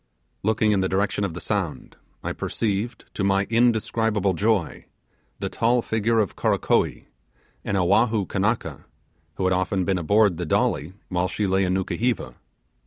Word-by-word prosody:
Looking 110 Hz, +1 st, +2 dB
in 100 Hz, -2 st, +2 dB
the 95 Hz, -, 0 dB
direction 100 Hz, +2 st, 0 dB
of 90 Hz, -5 st, -2 dB
the -, -, -5 dB
sound, 85 Hz, -12 st, -3 dB, 0.3 s
I -, -, -2 dB
perceived, 110 Hz, +2 st, -2 dB
to 100 Hz, -, -2 dB
my 100 Hz, 0 st, +3 dB
indescribable 110 Hz, -3 st, +2 dB
joy, 100 Hz, -1 st, 0 dB, 0.5 s
the -, -, -3 dB
tall 120 Hz, +1 st, +1 dB
figure 110 Hz, +1 st, 0 dB
of 105 Hz, -4 st, +1 dB
Karakoee, -, -, +1 dB, 0.6 s
an -, -, -2 dB
Oahu 100 Hz, +3 st, +2 dB
Kanaka, 95 Hz, -, -2 dB, 0.5 s
who -, -, -3 dB
had 95 Hz, 0 st, +3 dB
often 95 Hz, 0 st, 0 dB
been 95 Hz, -1 st, +1 dB
aboard 100 Hz, +1 st, +3 dB
the 90 Hz, -, -3 dB
'Dolly', 75 Hz, +2 st, 0 dB, 0.2 s
while 90 Hz, -1 st, 0 dB
she 105 Hz, +2 st, -2 dB
lay 95 Hz, 0 st, +2 dB
in 90 Hz, 0 st, 0 dB
Nukuheva. 115 Hz, +5 st, -1 dB
100 Hz, 155 wpm, -24 LUFS, 95-110 Hz, 0.6 s, my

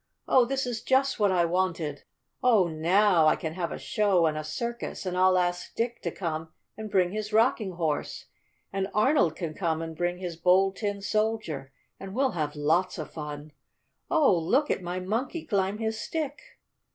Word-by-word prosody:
Oh, 255 Hz, -2 st, +5 dB
this 270 Hz, +2 st, -1 dB
is 240 Hz, -3 st, -3 dB
just 265 Hz, -1 st, +2 dB
what 205 Hz, -2 st, +3 dB
I 175 Hz, -2 st, +3 dB
wanted! 165 Hz, -4 st, -1 dB, 0.4 s
Oh, 220 Hz, -8 st, +4 dB
now 170 Hz, +2 st, +3 dB
I -, -, +5 dB
can 160 Hz, -1 st, -5 dB
have 170 Hz, -1 st, -3 dB
a -, -, -4 dB
show 195 Hz, -5 st, +2 dB
and 155 Hz, -1 st, +1 dB
a 155 Hz, -, -3 dB
circus 235 Hz, +9 st, -4 dB
and 180 Hz, -1 st, -2 dB
I'll 185 Hz, 0 st, +4 dB
ask 175 Hz, 0 st, -1 dB
Dick 235 Hz, +1 st, -2 dB
to -, -, -2 dB
come 160 Hz, -3 st, -4 dB, 0.2 s
and 215 Hz, 0 st, -7 dB
bring 185 Hz, -3 st, +2 dB
his 215 Hz, +1 st, -4 dB
Rocking 220 Hz, -3 st, +2 dB
Horse, 160 Hz, -4 st, -2 dB, 0.5 s
and 195 Hz, 0 st, -1 dB
Arnold 210 Hz, -, +3 dB
can 165 Hz, -3 st, -4 dB
come 160 Hz, -2 st, -1 dB
and 165 Hz, 0 st, -5 dB
bring 175 Hz, +2 st, -1 dB
his 180 Hz, -2 st, -5 dB
Bold 190 Hz, +2 st, +3 dB
Tin 205 Hz, -2 st, -3 dB
Soldier, 215 Hz, -11 st, -1 dB, 0.3 s
and 195 Hz, +1 st, -8 dB
we'll 265 Hz, +1 st, +2 dB
have 155 Hz, -5 st, -3 dB
lots 160 Hz, +6 st, +1 dB
of 155 Hz, -, -6 dB
fun. 150 Hz, -1 st, -7 dB, 0.6 s
Oh, 280 Hz, -11 st, +4 dB
look 250 Hz, -, +1 dB
at -, -, -1 dB
my 180 Hz, +1 st, -3 dB
Monkey 235 Hz, -, -3 dB
climb 195 Hz, -1 st, 0 dB
his 220 Hz, 0 st, -2 dB
stick!" 295 Hz, -3 st, -3 dB
185 Hz, 185 wpm, -27 LUFS, 165-220 Hz, 0.6 s, Oh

